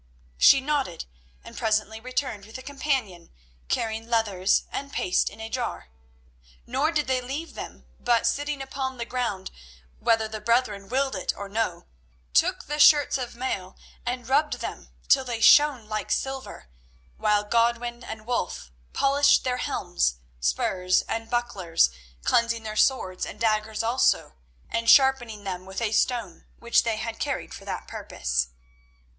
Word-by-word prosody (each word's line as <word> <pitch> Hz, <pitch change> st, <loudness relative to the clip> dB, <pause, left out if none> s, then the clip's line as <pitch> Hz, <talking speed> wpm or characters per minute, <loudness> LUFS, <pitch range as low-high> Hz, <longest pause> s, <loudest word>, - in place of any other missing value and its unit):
She 270 Hz, -, +7 dB
nodded, 270 Hz, -, -1 dB, 0.4 s
and -, -, -12 dB
presently 220 Hz, 0 st, 0 dB
returned 250 Hz, -4 st, -3 dB
with 220 Hz, -, -8 dB
a 260 Hz, -, -10 dB
companion 265 Hz, -, -2 dB, 0.4 s
carrying 225 Hz, -, -2 dB
leathers 205 Hz, -5 st, +2 dB
and 280 Hz, 0 st, -5 dB
paste 180 Hz, -, +1 dB
in -, -, -15 dB
a 220 Hz, -, -5 dB
jar. 240 Hz, -, -4 dB, 0.8 s
Nor 270 Hz, +6 st, 0 dB
did 300 Hz, -3 st, 0 dB
they 260 Hz, -1 st, 0 dB
leave 280 Hz, +7 st, -5 dB
them, -, -, -9 dB
but, 240 Hz, -1 st, +2 dB
sitting 290 Hz, -1 st, -1 dB
upon 265 Hz, -1 st, -4 dB
the 235 Hz, -, -3 dB
ground, 235 Hz, -7 st, -3 dB, 0.5 s
whether 225 Hz, -1 st, +2 dB
the 215 Hz, 0 st, -7 dB
brethren 210 Hz, -3 st, +1 dB
willed 265 Hz, 0 st, 0 dB
it 185 Hz, -, -1 dB
or 200 Hz, -, -6 dB
no, 195 Hz, -5 st, -2 dB, 0.5 s
took -, -, +2 dB
the 295 Hz, +1 st, -4 dB
shirts 290 Hz, -2 st, +6 dB
of 245 Hz, -2 st, -5 dB
mail 205 Hz, -7 st, -4 dB, 0.3 s
and 245 Hz, -1 st, -3 dB
rubbed 295 Hz, +3 st, +2 dB
them -, -, -7 dB, 0.2 s
till 270 Hz, -1 st, +5 dB
they 240 Hz, -3 st, -4 dB
shone 285 Hz, -2 st, +6 dB
like 215 Hz, 0 st, -3 dB
silver, 265 Hz, -, -3 dB, 0.5 s
while 210 Hz, -1 st, +2 dB
Godwin 235 Hz, +2 st, 0 dB
and 220 Hz, -1 st, -8 dB
Wulf 200 Hz, -, -3 dB, 0.2 s
polished 280 Hz, +1 st, +4 dB
their 250 Hz, -1 st, 0 dB
helms, -, -, -1 dB, 0.2 s
spurs, 180 Hz, -, +1 dB
and 225 Hz, 0 st, -4 dB
bucklers, 190 Hz, -, +1 dB, 0.3 s
cleansing 230 Hz, -, +2 dB
their 215 Hz, -1 st, -5 dB
swords 200 Hz, -7 st, +1 dB
and 210 Hz, -, -6 dB
daggers 220 Hz, 0 st, 0 dB
also, 235 Hz, -, +2 dB, 0.3 s
and 230 Hz, 0 st, -1 dB
sharpening 250 Hz, -6 st, +4 dB
them 185 Hz, -1 st, -5 dB
with 190 Hz, -, -5 dB
a 225 Hz, -3 st, -1 dB
stone 225 Hz, -6 st, -1 dB
which 235 Hz, 0 st, +3 dB
they 230 Hz, -2 st, -1 dB
carried 225 Hz, 0 st, -3 dB
for -, -, -10 dB
that -, -, -5 dB
purpose. 65 Hz, 0 st, -2 dB
230 Hz, 150 wpm, -26 LUFS, 210-260 Hz, 0.8 s, She